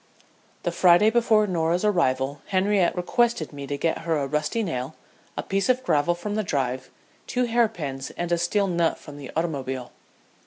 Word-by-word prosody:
The - - 0
Friday 185 +4 +5
before 225 -2 +3
Norah's 175 0 0
arrival 140 -8 +1
Henriette 195 -1 +2
requested 180 -2 0
me 140 -1 -7
to 145 - -3
get 165 +2 0
her 165 -1 -1
a 140 - -1
rusty 150 +11 -1
nail, 140 -5 -4 0.4
a - - -2
piece 195 +4 -1
of 255 0 +2
gravel 155 - +2
from 205 +4 -5
the 215 - 0
drive, 130 -6 -2 0.4
two 250 - 0
hair 235 -1 +3
pins, 140 -10 -5
and 175 0 -3
a 170 - +3
steel 200 +4 +1
nut 170 -3 +1
from 145 -2 -11
the 140 -2 -9
automobile. 135 -6 -3
170 Hz, 180 wpm, -25 LUFS, 145-205 Hz, 0.4 s, Friday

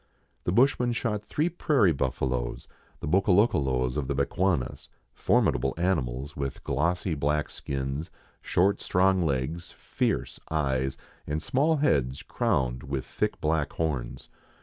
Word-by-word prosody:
The - - +1
bushman 125 +2 +3
shot 110 -3 -2
three 150 +9 0
prairie 145 - +2
bufialoes, 65 -2 -2 0.3
the - - -4
Bokolokolos 75 - +2
of 70 -3 -2
the 70 - -1
Bechuanas, 70 0 0 0.2
formidable 65 +2 +2
animals, 75 -6 -1
with 70 -2 -4
glossy 85 +6 0
black 75 +1 0
skins, 70 +4 -4 0.3
short 95 +3 +2
strong 95 0 +3
legs, 80 +2 -1
fierce - - -2
eyes, 65 -4 0 0.3
and 75 +1 -1
small 145 - +2
heads 70 - +1
crowned 60 -1 0
with 70 -1 -4
thick - - -2
black 75 -2 0
horns. 70 -7 -3
75 Hz, 125 wpm, -27 LUFS, 65-95 Hz, 0.3 s, bushman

